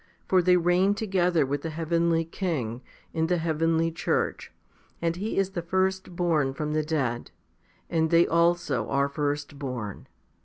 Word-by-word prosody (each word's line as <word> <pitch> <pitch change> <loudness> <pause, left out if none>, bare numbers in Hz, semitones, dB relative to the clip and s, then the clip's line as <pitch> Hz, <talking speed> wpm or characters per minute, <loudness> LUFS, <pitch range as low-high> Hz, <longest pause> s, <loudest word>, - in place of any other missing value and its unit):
For 185 -1 +4
they 180 +1 +4
reign 180 +3 +3
together 180 -7 +1
with 140 +1 -2
the 165 - -4
heavenly 165 +1 +1
King, 145 - -3 0.3
in 160 0 0
the 180 +1 +1
heavenly 165 0 +1
church, 165 +3 -1 0.5
and 165 0 0
He 205 +5 -3
is 195 -1 +1
the 175 - -3
firstborn 175 -5 0
from 150 +1 -3
the 155 - +2
dead* 135 -7 -2 0.6
and 160 -1 +1
they 170 +1 +5
also 170 -8 +1
are 140 0 +2
firstborn. 140 -6 -4
165 Hz, 145 wpm, -27 LUFS, 145-175 Hz, 0.6 s, they